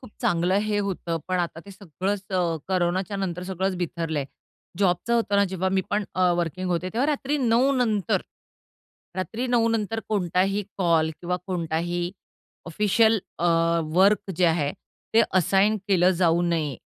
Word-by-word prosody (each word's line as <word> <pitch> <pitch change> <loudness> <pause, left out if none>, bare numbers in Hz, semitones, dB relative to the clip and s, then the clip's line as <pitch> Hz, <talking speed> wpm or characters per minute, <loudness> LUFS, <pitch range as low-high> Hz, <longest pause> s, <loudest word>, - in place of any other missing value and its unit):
खूप 255 - -13
चांगलं 175 +2 +1
हे 210 -1 +1
होतं. 185 -4 -2
पण 185 0 0
आता 170 -2 -2
ते - - -10
सगळंच 195 +1 -4
अ, 175 -3 0
कोरोनाच्या 185 +1 0
नंतर 180 -3 -3
सगळंच 190 0 -2
बिथरलंय. 165 -4 -2 0.5
जॉबचं 195 +4 +1
होतं 225 -3 +1
ना 200 - +5
जेव्हा 190 0 -1
मी 190 - +3
पण 205 +1 0
अ, 185 -1 +3
वर्किंग 175 +2 -2
होते, 180 +1 -1
तेव्हा 245 +5 +1
रात्री 295 -1 0
9:00 250 +1 +3
नंतर, 215 -7 +1 1.0
रात्री 220 +7 -3
9:00 240 -2 +2
नंतर 225 0 -1
कोणताही 195 0 +1 0.2
कॉल 165 -3 +2
किंवा 180 +1 -1
कोणताही 175 0 -2 0.6
ऑफिशियल 210 +5 +3 0.2
अ, 175 - +1 0.5
वर्क 200 +2 +3
जे 180 - +3
आहे, 160 -3 +1 0.4
ते 230 - +7 0.2
असाइन 195 +4 +3
केलं 185 -2 +4
जाऊ 170 -1 +3
नये, 160 -6 -1
185 Hz, 155 wpm, -25 LUFS, 175-210 Hz, 1.0 s, ते